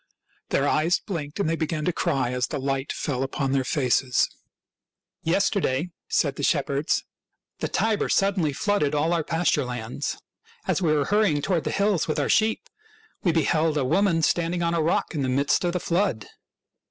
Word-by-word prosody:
Their 140 - +1
eyes 160 +5 +2
blinked, 155 -3 -5
and 200 - +1
they 165 - +1
began 160 -1 -2
to 180 - +1
cry 130 -5 0
as 125 -1 -1
the 150 - -4
light 135 0 -2
fell 130 -5 -2
upon 135 0 -1
their 135 -1 +2
faces. 130 -2 +1 0.5
" - - -66
Yesterday," 180 -5 +1 0.2
said - - +1
the - - -4
shepherds, 140 +4 +1 0.3
" - - -56
the - - -1
Tiber 220 -2 0
suddenly 190 -6 +2
flooded 150 -1 0
all 160 +4 +1
our 165 -2 +1
pasture 165 -2 +1
lands. 125 +2 -4 0.5
As - - 0
we 165 -4 +2
were 150 -2 +2
hurrying 200 -8 +2
toward 175 -3 0
the - - 0
hills 200 -3 +1
with 155 - -1
our 145 - 0
sheep 220 0 +2 0.5
we 175 - +2
beheld 160 -1 +1
a 135 - +1
woman 165 +2 +2
standing 175 +2 +1
on 170 0 +1
a 170 - +1
rock 160 +3 0
in 150 - -2
the 130 - 0
midst 140 +6 +2
of 175 -1 0
the 180 - 0
flood. 170 - 0
155 Hz, 190 wpm, -25 LUFS, 140-175 Hz, 0.5 s, eyes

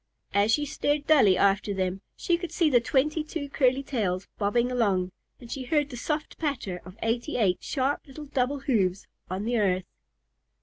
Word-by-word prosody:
As 200 +2 +3
she 295 +5 +2
stared 290 +1 -1
dully 260 -12 +5
after 200 +1 +2
them 190 0 -1
she 345 - +1
could 345 -1 -5
see 330 -3 +2
the 245 -2 +5
twenty 300 +6 +1
two 305 -2 -5
curly 265 -1 +2
tails 195 -9 -2
bobbing 235 +4 +1
along, 195 -7 +1 0.3
and 235 - -12
she 265 -2 -4
heard 290 +1 +1
the - - -6
soft 300 +5 -3
patter 250 - -2
of 185 +3 -12
eighty 235 +6 -1
eight 195 -6 +2
sharp 275 +1 -1
little 295 +2 -9
double 275 0 -1
hoofs 200 -9 +1 0.2
on 185 +2 -3
the 235 0 +1
earth. 185 -3 +1
245 Hz, 180 wpm, -27 LUFS, 200-290 Hz, 0.3 s, dully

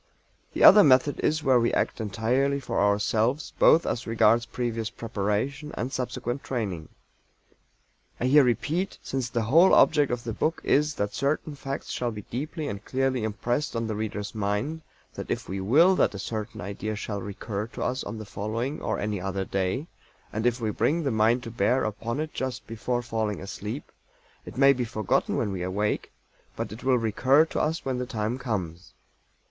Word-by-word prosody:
The - - 0
other 210 - +10
method 135 0 +4
is 155 0 0
where 130 -2 +4
we 115 - +2
act - - -1
entirely 125 +7 0
for 135 - -2
ourselves 110 +7 +1
both 165 - +6
as 120 - -2
regards 115 +1 +3
previous 115 -2 -3
preparation 115 +6 -2
and 125 +3 -3
subsequent 125 +1 -3
training. 100 -11 -3 1.3
I - - -1
here 140 +3 +6
repeat, 155 +9 0
since 130 -2 -3
the 115 -2 -1
whole 165 +12 +6
object 145 -4 +4
of 120 -1 -2
the 115 -3 -4
book 160 +8 -1
is 150 +2 +2
that 105 0 -2
certain 145 +2 -1
facts 135 -1 -5
shall 120 - -1
be 105 -3 -7
deeply 150 +5 -4
and 100 -3 -5
clearly 130 -1 0
impressed 120 +6 -2
on 115 0 -1
the 110 - -2
reader's 105 -1 -4
mind, 105 +10 -2 0.3
that - - -7
if - - -3
we 95 +1 -4
will 160 - +5
that - - +2
a - - -4
certain 105 +1 -5
idea 100 +3 -4
shall 100 -1 -4
recur 100 +2 -5
to - - -6
us 130 +2 -1
on 105 +2 -6
the 110 - -7
following, 115 +8 -3
or - - -1
any 105 -2 -2
other 95 0 -2
day, 95 +10 -1 0.5
and 110 +3 0
if 120 +1 0
we 110 -2 -1
bring 165 +9 +1
the 140 - 0
mind 115 +3 +2
to 115 - -7
bear 120 +4 +1
upon 115 +5 -3
it 155 0 -3
just 130 -1 -4
before 120 +2 -2
falling 110 -3 -2
asleep, 105 +7 -6 0.6
it - - -9
may 140 +1 +6
be 125 -2 -2
forgotten 110 -4 0
when 105 - 0
we 95 -2 -4
awake, 100 +4 -1 0.4
but - - -4
it 110 - -9
will 130 -1 +3
recur 130 +7 +3
to - - -3
us 160 +2 -1
when 130 -2 -1
the 125 - -3
time 110 +3 -2
comes. 95 -8 -4
115 Hz, 185 wpm, -26 LUFS, 105-135 Hz, 1.3 s, other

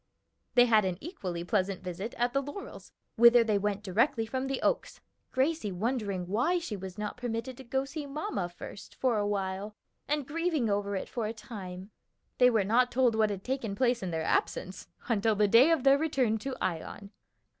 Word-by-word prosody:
They 245 -1 +7
had 220 -3 +4
an 185 -2 -1
equally 185 - -5
pleasant 190 -1 -1
visit 185 +5 -5
at 240 0 +1
the 275 - +2
Laurels, 290 +8 -9 0.3
whither 235 +1 +8
they 215 -3 +1
went 205 0 -2
directly 225 +4 +1
from 260 +4 -3
the 270 -1 -2
Oaks, - - 0 0.3
Gracie 265 -4 0
wondering 200 -2 -2
why 245 - +1
she 330 -11 -4
was 190 -2 -8
not 210 +2 -4
permitted 245 +1 -4
to 265 - -9
go 265 +2 0
to 275 +1 -8
see 295 -1 -5
mamma 275 - -3
first 175 +3 -10
for 245 -5 +1
a 205 - 0
while, 200 +1 -3 0.3
and 295 -1 0
grieving 315 -7 0
over 200 0 -1
it 190 - -3
for 230 -4 -3
a 220 - -3
time. 195 -4 -8 0.5
They 250 -1 +7
were 225 -4 +2
not 245 +5 +3
told 250 -2 +3
what 220 -1 +2
had 195 -2 -5
taken 255 -6 -2
place 245 0 +1
in 185 - -3
their 160 -1 -2
absence, 185 +3 -1 0.2
until 220 -2 +2
the 210 0 +3
day 235 +9 +7
of 325 -6 +2
their 275 +1 +6
return 260 -8 +1
to 265 +3 -4
Ion. 185 +3 -4
225 Hz, 200 wpm, -30 LUFS, 200-260 Hz, 0.5 s, whither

